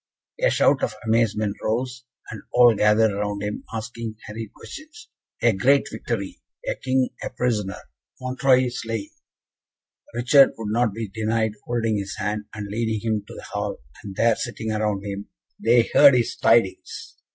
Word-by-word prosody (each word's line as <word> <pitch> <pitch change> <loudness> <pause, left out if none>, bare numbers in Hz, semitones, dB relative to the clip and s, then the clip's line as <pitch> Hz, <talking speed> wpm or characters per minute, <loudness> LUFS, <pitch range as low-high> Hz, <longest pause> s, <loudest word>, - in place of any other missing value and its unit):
A - - +5
shout 140 - +3
of 110 - -1
amazement 110 -2 +1
arose, 125 +2 -2 0.3
and 110 - -7
all 120 -1 +7
gathered 105 +1 +3
round 105 0 -3
him, 105 0 -4
asking 115 0 -5
hurried 105 0 -7
questions. 325 +2 -12 0.3
"A 120 -1 +5
great 135 +9 +3
victory 100 -5 -4 0.2
the - - -2
King 130 -1 +1
a - - -3
prisoner 105 -6 -1 0.4
Montreuil 130 0 +2
slain!" 115 -4 -4 1.0
Richard 130 +3 +5
would 105 -2 -4
not 120 -1 +2
be 115 -1 -4
denied 110 +1 -1
holding 115 -3 0
his 100 0 -5
hand, 105 0 -2
and 105 -1 -5
leading 110 +1 -2
him 110 -2 -1
to - - -10
the - - -9
hall, - - -3 0.3
and 100 -3 -8
there, 115 +1 +3
sitting 115 -2 -4
around 105 -2 -1
him, 100 0 -6 0.3
they 115 +1 +4
heard 140 -3 +8
his 120 -1 0
tidings. 115 -4 +1
115 Hz, 155 wpm, -23 LUFS, 105-120 Hz, 1.0 s, heard